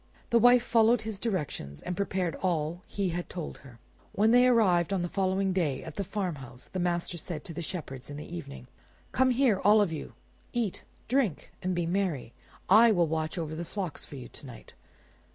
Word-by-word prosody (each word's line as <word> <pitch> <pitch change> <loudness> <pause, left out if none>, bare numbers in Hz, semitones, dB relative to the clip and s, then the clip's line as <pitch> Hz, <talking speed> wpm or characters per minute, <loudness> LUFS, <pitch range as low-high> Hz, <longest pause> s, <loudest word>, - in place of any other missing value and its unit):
The 235 - +6
wife 245 +1 +6
followed 230 -1 +4
his 215 -3 -4
directions 150 - -3
and 180 - -3
prepared 185 -3 -1
all 170 -1 -1
that - - -18
he 200 -2 +1
had 175 +1 -4
told 175 -4 -6
her. 125 -4 -14 0.4
When 215 +2 +3
they 245 +1 +6
arrived 195 -8 +4
on 190 -3 0
the - - -1
following 190 +1 0
day 160 -8 0
at 160 - -8
the 200 - -2
farmhouse, 160 - -5
the 185 - -4
master 175 -1 -1
said 155 -1 -5
to 165 - -7
the 170 - -5
shepherds 145 -7 -6
in 145 - -6
the 150 - -7
evening— 70 -6 -8 0.5
"Come 260 0 +3
here, 250 -5 +3
all 210 +2 +6
of 200 -5 +2
you; 155 - -6 0.4
eat, 230 -6 -1 0.3
drink, 245 - 0
and 185 0 -1
be 175 -1 0
merry. 170 -9 -1 0.3
I 225 +4 +7
will 175 -5 +3
watch 160 +1 -2
over 160 -2 -3
the 165 +2 -4
flocks 180 -1 -5
for - - -10
you 125 -3 -8
to - - -11
night." 120 - -12
180 Hz, 205 wpm, -29 LUFS, 155-210 Hz, 0.5 s, I